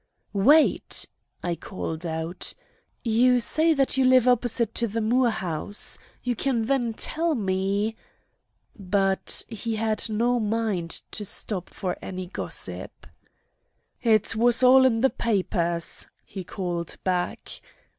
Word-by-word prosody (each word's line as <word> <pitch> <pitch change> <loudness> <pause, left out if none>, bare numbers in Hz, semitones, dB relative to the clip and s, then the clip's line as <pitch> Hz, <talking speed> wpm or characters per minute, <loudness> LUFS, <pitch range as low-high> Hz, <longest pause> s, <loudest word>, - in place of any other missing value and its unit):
"Wait!" 285 +11 +3 0.4
I 175 - -1
called 165 0 -6
out. 160 +2 -4 0.5
"You 245 +2 +4
say 315 +8 +2
that 270 -1 +1
you 265 - +4
live 255 -1 +5
opposite 240 -2 +2
the 230 -2 -2
Moore 240 +3 +2
house. 190 -1 0 0.2
You 245 -1 -1
can 240 -1 0
then 240 -2 0
tell 325 +5 0
me—" 200 +1 -1 0.8
But 195 -1 +1
he 225 +1 -4
had 220 +1 -1
no 240 +3 +1
mind 210 -6 -1
to 210 - -4
stop 195 -2 -2
for 180 -2 -4
any 185 -1 -6
gossip. 180 - -5 1.0
"It 220 -2 +3
was 240 +2 +4
all 260 +1 +7
in 225 -3 +2
the 265 - +3
papers," 175 -6 -1 0.2
he 190 - -7
called 175 -2 -4
back. 180 -1 -3
220 Hz, 125 wpm, -25 LUFS, 190-245 Hz, 1.0 s, all